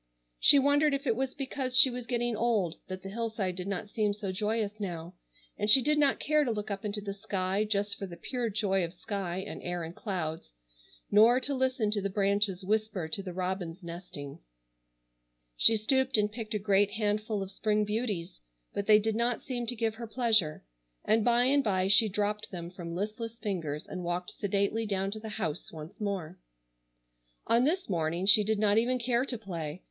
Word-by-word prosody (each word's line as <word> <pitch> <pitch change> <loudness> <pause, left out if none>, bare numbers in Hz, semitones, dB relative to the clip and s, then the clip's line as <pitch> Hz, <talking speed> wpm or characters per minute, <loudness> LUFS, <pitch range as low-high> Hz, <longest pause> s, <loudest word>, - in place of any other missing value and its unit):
She - - +7
wondered 285 +1 +3
if 275 +1 -5
it 230 - +2
was 265 +1 -2
because 265 -2 -2
she 260 0 +9
was 245 -1 -6
getting 240 -1 0
old 210 -7 0
that 185 0 -6
the 195 - -6
hillside 220 -4 -2
did 180 +1 -5
not 200 +1 -4
seem 210 -2 0
so 205 -2 -4
joyous 210 +2 -2
now, 175 -3 -5 0.5
and 210 +1 0
she 225 - +9
did 300 +3 +2
not 285 -2 +3
care 305 0 +2
to 265 - -1
look 210 -2 -3
up 195 -1 -4
into 210 0 -2
the 200 -1 -4
sky 195 -1 -1
just 205 -1 -1
for 195 - -4
the 170 -2 -10
pure 240 +6 -3
joy 195 -2 0
of 170 +1 -5
sky 185 -2 -4
and 190 - -6
air 175 -1 -3
and 165 +2 -7
clouds, 160 - -4 0.6
nor 225 +4 +6
to 280 - -2
listen 255 -5 0
to 210 -1 0
the 200 - -1
branches 200 -1 0
whisper 215 -4 -1
to 195 - -2
the 190 -2 -6
robins 180 -1 -4
nesting. 170 -4 -8 1.2
She 225 - +5
stooped 265 +4 +2
and 210 0 +1
picked 220 -1 -5
a - - +3
great 205 0 +2
handful 215 -1 -1
of 195 - -8
spring 210 +1 0
beauties, 210 - -3 0.3
but 200 - -3
they 215 -1 +8
did 215 +1 0
not 235 0 0
seem 240 -2 -3
to 245 - -1
give 225 -1 0
her 230 +1 -7
pleasure, 220 - +1 0.4
and 220 0 +3
by 240 +1 +4
and 275 +2 +3
by 190 -4 +1
she 205 +3 +6
dropped 210 +1 -2
them 170 -2 -7
from 170 -2 -7
listless 220 +4 -4
fingers 165 -9 -3
and 180 -1 -6
walked 175 +1 -2
sedately 205 +3 -1
down 195 -1 -1
to 215 - -2
the 220 0 -7
house 195 -8 -4
once 160 +7 -10
more. 195 -6 -3 1.1
On 235 +2 +3
this 360 +6 0
morning 170 0 -1
she 210 +1 +7
did 215 +1 0
not 210 +1 +3
even 250 +2 +1
care 245 +1 +1
to 255 -3 -4
play. 170 -6 -6
210 Hz, 200 wpm, -30 LUFS, 185-230 Hz, 1.2 s, she